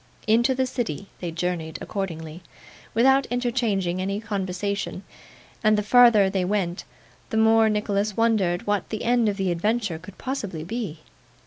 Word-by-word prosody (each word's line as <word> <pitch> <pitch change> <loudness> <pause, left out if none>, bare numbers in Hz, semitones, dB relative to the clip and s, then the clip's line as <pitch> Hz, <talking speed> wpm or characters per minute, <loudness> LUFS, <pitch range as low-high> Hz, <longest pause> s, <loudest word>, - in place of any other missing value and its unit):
Into 235 +4 +3
the 260 0 +1
city 210 - -4
they 175 - -4
journeyed 165 -1 -3
accordingly, 165 -4 -5 0.5
without 265 +4 +4
interchanging 230 -8 0
any 195 +2 -2
conversation; 200 -1 -3 0.6
and 215 -1 +4
the 210 - 0
farther 235 -2 +6
they 190 -1 0
went, 180 -2 -1 0.4
the 220 - -2
more 220 0 +5
Nicholas 210 -1 -1
wondered 210 -6 +1
what 205 -2 -1
the 220 - -4
end 235 -2 +3
of 200 - -3
the 190 -2 0
adventure 205 -1 -1
could 185 +3 -13
possibly 205 - -4
be. 180 -5 -5
205 Hz, 145 wpm, -24 LUFS, 180-225 Hz, 0.6 s, farther